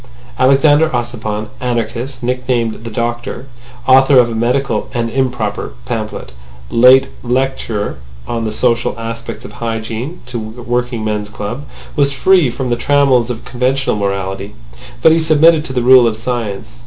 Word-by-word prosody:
Alexander 145 +4 +4
Ossipon, 115 -4 -3
anarchist, 120 +2 -3
nicknamed 125 -3 -1
the - - -4
Doctor, 120 +2 -3 0.4
author 135 +1 +6
of 120 -2 +5
a - - -3
medical 120 0 0
(and 115 -1 -1
improper) 130 - -2
pamphlet, 60 - -4 0.4
late 130 +3 +6
lecturer 120 - -2 0.3
on 115 -1 -2
the 110 - -2
social 115 0 0
aspects 115 0 -6
of - - -9
hygiene 115 +6 -4
to 125 -1 -5
working 120 +1 -3
men's 105 -1 -2
clubs, 110 +6 -6 0.3
was 140 -2 +2
free 175 +1 +3
from 125 +1 -4
the 120 - +2
trammels 130 -2 +2
of 120 -2 -5
conventional 130 +1 0
morality—but 95 - -2
he 165 - +4
submitted 160 0 +4
to 145 - -5
the 125 -2 -1
rule 125 -1 +7
of 110 -1 -2
science. 110 - -4
120 Hz, 140 wpm, -16 LUFS, 110-130 Hz, 0.4 s, rule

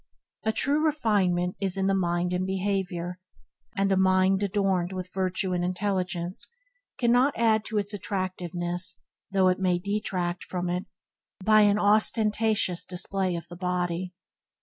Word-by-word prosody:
A 220 - +2
true 290 +6 +1
refinement 200 - +1
is 195 -1 -1
in 190 - +1
the 195 - +2
mind 175 -1 0
and 180 +1 0
behaviour, 190 -2 -2 0.6
and 195 0 +2
a - - +4
mind 190 +1 +3
adorend 195 -3 0
with 185 -1 -6
virtue 185 0 -1
and 175 -1 0
intelligence 180 -1 -2 0.5
cannot 250 +2 +3
add 220 -2 +3
to 220 - -3
its 205 0 -1
attractiveness 180 -2 -3 0.3
though 190 -1 +3
it 185 0 +2
may 180 -2 +2
detract 185 -2 -2
from 180 -1 -3
it) 180 +1 -2 0.6
by 215 0 +6
an 205 0 +4
ostentatious 215 -2 +2
display 185 0 -2
of 170 0 -6
the 175 - -10
body. 180 0 -2
190 Hz, 145 wpm, -27 LUFS, 180-205 Hz, 0.6 s, by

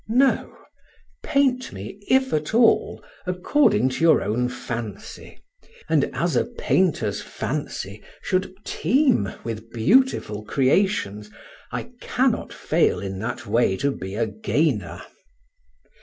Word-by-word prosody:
No; 260 +4 +2 0.6
paint 275 -4 +1
me, 100 - -8
if 265 0 +3
at 155 +7 -1
all, 230 -1 +3 0.2
according 180 - +2
to 130 - -3
your 165 -1 +5
own 115 +5 0
fancy, 115 -5 -7 0.5
and - - +3
as - - -1
a - - +3
painter's 135 - 0
fancy 100 +2 -5 0.2
should 185 0 0
teem 260 - +2
with 115 -1 -6
beautiful 120 - +2
creations, 130 - +1 0.4
I - - -5
cannot - - 0
fail - - +1
in 95 -1 -5
that 120 +4 -4
way 105 -2 +2
to 140 +5 +1
be 95 -6 -6
a 115 +1 +1
gainer. 110 +3 -1
130 Hz, 115 wpm, -23 LUFS, -, 0.6 s, your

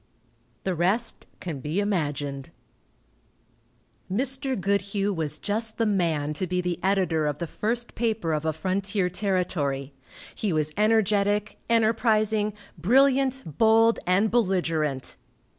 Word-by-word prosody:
The 190 - 0
rest 195 +7 0
can 160 -6 -5
be 150 +8 -2
imagined. 145 -8 -2 1.6
Mr. 265 +3 -1
Goodhue 200 +1 0
was 155 -3 -2
just 220 +5 -2
the 230 - +1
man 165 -8 0
to 185 +4 -2
be 180 +1 -1
the 180 -1 -2
editor 180 -5 +1
of 145 -1 -2
the 170 - -3
first 230 +8 -3
paper 220 -8 -1
of 150 0 -1
a 160 - +1
frontier 190 +3 -1
territory. 170 -8 -1 0.4
He 210 - -2
was 155 -1 0
energetic, 210 -1 +2
enterprising, 220 -2 +2 0.3
brilliant, 265 - +3 0.2
bold 225 +1 +5
and 195 +4 +3
belligerent. 165 - 0
195 Hz, 120 wpm, -26 LUFS, 160-220 Hz, 1.6 s, bold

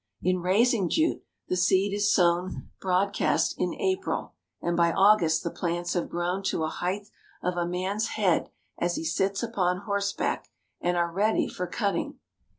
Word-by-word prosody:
In 185 0 +2
raising 195 +2 +2
jute, 320 0 +1 0.3
the - - 0
seed 190 +2 +3
is 205 0 +2
sown 175 0 +1
broadcast 190 +2 +1
in - - 0
April, 380 -3 -1 0.3
and 170 0 -1
by 170 0 +3
August 190 -4 +4
the 170 - -2
plants 175 0 -2
have 175 - -1
grown 175 +3 -1
to 160 - 0
a 155 - 0
height 195 +5 -3 0.4
of 180 0 0
a 175 -1 0
man's 190 +5 -1
head 190 -5 +2 0.3
as 175 0 0
he - - -3
sits 195 +6 0
upon 180 -5 0
horseback, 200 -1 -1 0.3
and 175 0 +1
are 170 0 +1
ready 210 +5 +1
for 180 - -4
cutting. 200 -1 -2
185 Hz, 160 wpm, -27 LUFS, 175-200 Hz, 0.4 s, August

